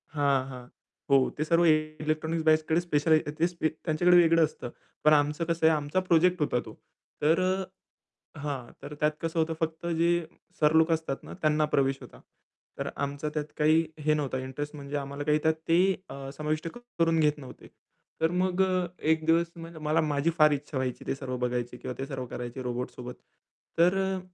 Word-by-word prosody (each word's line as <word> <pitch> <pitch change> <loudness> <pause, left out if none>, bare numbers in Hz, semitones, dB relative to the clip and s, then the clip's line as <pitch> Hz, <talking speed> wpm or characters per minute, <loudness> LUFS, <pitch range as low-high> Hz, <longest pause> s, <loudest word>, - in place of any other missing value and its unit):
हां, 140 -2 +3
हां. 125 -2 -8 0.5
हो, 140 - +5 0.2
ते 150 - 0
सर्व 170 +1 +4
इलेक्ट्रॉनिक्स 155 +1 0
बॅचकडे 155 +1 +3
स्पेशल 150 -1 +1
आहे 155 -1 -1
ते 170 - +4
स्पे 170 -2 -1
त्यांच्याकडे 170 +3 +2
वेगळं 165 -1 +5
असतं. 135 -5 -3 0.3
पण 155 - +6
आमचं 150 +2 +2
कसं 165 -1 0
आहे, 160 - +4
आमचा 150 +4 -1
प्रोजेक्ट 175 +1 +4
होता 135 -4 +1
तो. - - -10 0.5
तर 160 +4 +3
अ 185 +1 0 0.7
हां, 140 -4 -5
तर 145 - -8
त्यात 150 0 +3
कसं 165 0 -2
होतं 160 0 +1
फक्त 160 +1 -3
जे 170 - +3 0.5
सर 150 0 +4
लोक 160 +1 +5
असतात 160 -4 -2
ना - - -9
त्यांना 155 0 +2
प्रवेश 135 0 +2
होता. - - -13 0.6
तर - - -2 0.2
आमचा 145 +2 -4
त्यात 150 -1 -2
काही 160 +2 +4
हे 155 +1 +2
नव्हता 145 -3 -1
इंटरेस्ट 140 +4 -6
म्हणजे 145 0 -5
आम्हाला 140 +1 -5
काही 150 0 +3
त्यात 160 - +4 0.2
ते 165 - +5 0.3
अ, 135 0 -7
समाविष्ट 155 +1 -2 0.3
करून 165 -1 +3
घेत 150 -1 +2
नव्हते. 135 -3 -12 0.5
तर 160 +1 +2
मग 185 0 +1
अ, 185 -1 0 0.2
एक 160 0 0
दिवस 165 +1 +4 0.4
मला 155 +2 +2
माझी 150 0 0
फार 155 -1 +6
इच्छा 145 0 -3
व्हायची 130 -1 -3
ते - - 0
सर्व 130 -2 -5
बघायची 125 0 -2
किंवा 125 - -6
ते 135 - -2
सर्व 135 -2 -5
करायचे 120 +1 -6
रोबोट्ससोबत. 125 0 -5 0.6
तर 180 +3 +5
अ, 190 0 -1
155 Hz, 185 wpm, -28 LUFS, 140-165 Hz, 0.7 s, पण